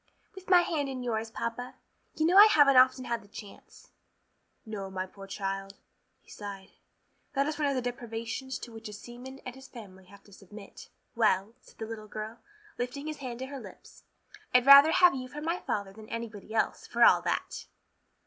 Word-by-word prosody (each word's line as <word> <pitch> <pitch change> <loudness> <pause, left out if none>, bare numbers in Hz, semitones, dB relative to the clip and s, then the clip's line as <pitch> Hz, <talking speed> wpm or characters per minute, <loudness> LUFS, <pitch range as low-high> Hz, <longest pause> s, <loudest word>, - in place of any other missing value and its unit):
"With 380 -2 -12
my 360 -2 +7
hand 305 -5 -2
in 255 -2 -5
yours, 225 -2 -2
papa. 235 +2 -5 0.4
You 315 - +1
know 350 +3 +3
I 410 +2 +10
haven't 290 -9 +5
often 255 0 +5
had 235 -1 -2
the 205 - -18
chance." 205 -1 -13 0.7
"No, 205 -3 -6
my 185 -1 -4
poor 195 +1 -13
child," 195 0 -4 0.5
he - - -24
sighed, 200 -1 -9 0.6
"that 275 -1 +1
is 305 0 -3
one 295 - +1
of 280 - 0
the 255 - -1
deprivations 240 +1 -5
to 240 - -10
which 225 -1 -9
a - - -9
seaman 245 +5 -10
and 255 - -6
his 265 +1 -13
family 190 -6 -13
have 200 +2 -17
to 205 - -19
submit." 200 +1 -13 0.2
"Well," 215 -2 +1
said - - -21
the 220 - -5
little 220 -1 -8
girl, 215 +2 -7 0.4
lifting 250 +4 -4
his 310 -1 -5
hand 255 -4 -6
to - - -3
her 275 0 -7
lips, - - -14 0.5
"I'd 250 0 +5
rather 280 +3 +9
have 360 -1 +6
you 255 -1 -5
for 290 +4 -8
my 335 +4 -2
father 200 -2 -3
than 215 +1 -13
anybody 230 -3 -7
else, 225 - -1
for - - +2
all - - +6
that." - - -3
235 Hz, 195 wpm, -29 LUFS, 210-275 Hz, 0.7 s, I